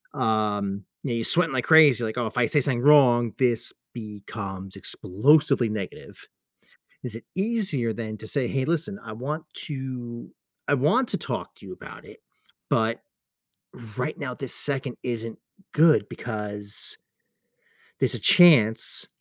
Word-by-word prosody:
Um, 105 -2 -1 0.2
you 135 - -3
know, - - 0
you're 115 - -1
sweating 165 +3 +2
like 130 -2 -1
crazy, 150 -7 +6
like, 110 +1 -3
"Oh, 120 - 0
if 110 +3 -8
I 120 - +3
say 145 - +2
something 125 -3 -1
wrong, 125 -5 +5
this 120 -2 +1 0.2
becomes 100 -3 -7
explosively 135 +4 +2
negative." 105 -3 -7 0.8
Is 120 -3 -5
it 115 - -9
easier 190 - -1
than 110 -1 -6
to 110 - -9
say, 135 -1 0
"Hey, 135 +1 -1
listen, 170 +6 -1
I 110 - -9
want 145 +8 -5 0.2
to 125 -4 -6 0.4
I - - +2
want - - +2
to - - 0
talk - - -5
to - - -15
you - - -8
about - - -12
it, - - -15 0.5
but 115 +1 +1 1.0
right 125 +4 -2
now, 140 -3 -4
this 130 0 -4
second 135 -3 0
isn't 115 -2 -4 0.3
good 155 0 +4
because" 105 -3 -5 1.1
there's - - +1
a - - -5
chance 125 -12 +5
120 Hz, 150 wpm, -25 LUFS, 110-140 Hz, 1.1 s, crazy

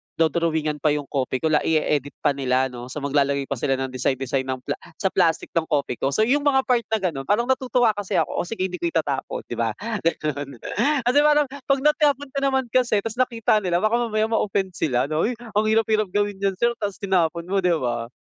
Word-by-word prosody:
do-drawingan 160 -2 0
pa 150 0 +2
yung 145 - -2
Kopiko, 135 +3 -1
la-i-e-edit 150 -2 +1
pa 145 - +4
nila 130 -1 0
'no? 120 0 -8
So 140 +2 -7
maglalagay 140 0 +1
pa 130 - -2
sila 135 0 +1
ng 130 0 -3
design 130 +1 0
design 130 0 -2
ng 130 -1 -4
pla - - -4 0.2
sa 190 -2 -1
plastic 165 -4 +1
ng 165 -1 0
Kopiko. 140 -4 -1
So 150 +11 +2
yung 270 +6 +3
mga 265 -2 +4
part 240 -2 +1
na 220 -1 0
ganon, 135 -7 -2
parang 215 +3 +2
natutuwa 250 -3 +2
kasi 205 -2 -4
ako, - - +1
"Oh 175 - -2
sige, 220 -5 -3
hindi 180 -2 -3
ko 170 - 0
itatapon," 150 -5 -2
di 120 - -7
ba? 115 -2 0 0.3
Gano'n. 145 -4 -2 0.5
Kasi 245 +4 +2
parang 295 0 +5
'pag 275 0 -1
natapon 290 -2 +2
ko 275 - -2
naman 265 -1 +1
kasi 240 -5 +2
tapos 225 +2 -5
nakita 230 -4 +2
nila 180 -1 0
baka 230 +3 +2
mamaya 215 0 0
ma-offend 195 -3 0
sila 125 -7 0
'no? 155 +7 0
"Uy, 245 - -2
ang 220 -2 -2
hirap-hirap 215 -1 +2
gawin 205 -1 0
niyan 195 -1 0
sir 235 +4 +2
tapos 200 -2 -3
tinapon 170 -4 0
mo." 200 - +2
Di 180 -2 +2
ba? 120 -4 -2
175 Hz, 215 wpm, -23 LUFS, 140-225 Hz, 0.5 s, parang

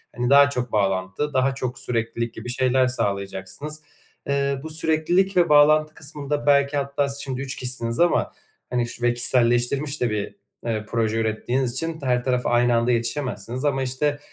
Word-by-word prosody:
hani, 120 0 -1
daha 140 +1 +7
çok 125 -4 -3
bağlantı, 95 +7 -1
daha 130 0 +2
çok 125 -1 -4
süreklilik 115 -1 -2
gibi 115 +2 -8
şeyler 130 +1 +2
sağlayacaksınız. 100 +6 -4 0.5
Iıı, 140 -1 0
bu 160 - -6
süreklilik 160 +5 +1
ve 175 - +4
bağlantı 155 +1 +5
kısmında 145 -1 -5
belki 140 0 +3
hatta 140 0 -1
siz 140 0 -6
şimdi 130 -1 -4
3 135 -1 -4
kişisiniz 120 -2 -3
ama, 175 0 +2 0.4
hani, 120 -1 0
şu 120 - -10
ve 120 0 +3
kişiselleştirilmiş 120 +4 +1
de 120 - +2
bir, 105 -1 -3 0.3
eee, 110 -2 -1
proje 115 -1 0
ürettiğiniz 120 +3 -1
için 165 +2 -3
t 140 - -8
her 125 -1 +1
tarafa 125 -1 0
aynı 120 0 +3
anda 115 +1 +2
yetişemezsiniz 120 0 -2
ama, 135 -2 +1
işte, 145 +3 -1
130 Hz, 170 wpm, -23 LUFS, 120-145 Hz, 0.5 s, daha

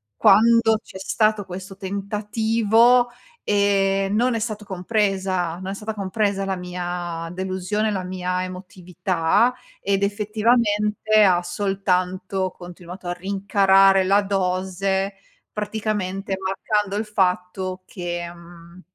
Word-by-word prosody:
quando 225 +1 +5
c'è - - -11
stato 215 +1 +1
questo 190 +1 -8
tentativo, 220 +4 +2 0.3
ehm, 195 -1 +2
non 245 +2 +2
è 225 - -1
stato 215 -2 -4
compresa 190 -3 -1
non 190 - -7
è - - -3
stata 215 +2 -5
compresa 200 0 -1
la 195 -1 -1
mia 175 -2 -5
delusione, 190 +3 -2
la 190 -2 -2
mia 180 0 -2
emotività 185 +3 0 0.3
ed 195 0 0
effettivamente 210 0 +2
ha 180 -3 +4
soltanto 185 0 -1
continuato 175 +1 -10
a 175 - -1
rincarare 195 0 +3
la 195 +2 +4
dose 190 0 -1 0.4
praticamente 205 -2 -2
marcando 200 +1 -1
il 215 +1 -1
fatto 185 -2 -1
che, 175 -2 -5
mhmm 170 +1 -15
195 Hz, 110 wpm, -22 LUFS, 185-210 Hz, 0.4 s, quando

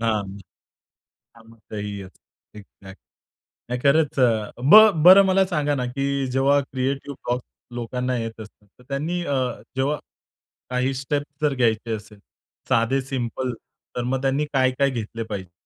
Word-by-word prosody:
हां. 110 -3 0 1.1
कामाचंही 110 -3 -8
असतं, 95 +2 -18
एक्झॅक्ट 100 -1 -15 0.7
नाही 125 0 -2
खरंच. 145 0 +3
अ, 115 -4 +2 0.2
ब - - +11 0.3
बरं 190 +3 +9
मला 190 0 +3
सांगा 150 -5 0
ना, 125 -2 -2
की 135 +1 -2
जेव्हा 135 +2 +3
क्रिएटिव्ह 135 +2 -3
ब्लॉक्स 120 +1 -1 0.3
लोकांना 125 +1 -2
येत 115 -1 -5
असतात, 105 -1 -14
तर 125 - -17
त्यांनी 160 +6 -2
अ, 140 - -1 0.4
जेव्हा 140 +3 0 0.7
काही 125 +1 0
स्टेप्स 145 +2 -4
जर 150 -2 +2
घ्यायचे 115 -2 0
असेल, 105 0 -12 0.5
साधे 115 +4 +2
सिंपल 130 -1 -3 0.4
तर 125 - -2
मग 130 +2 -1
त्यांनी 140 +2 +1
काय-काय 130 +1 +2
घेतले 115 -2 -5
पाहिजे? 100 -5 -7
130 Hz, 140 wpm, -23 LUFS, 115-140 Hz, 1.1 s, ब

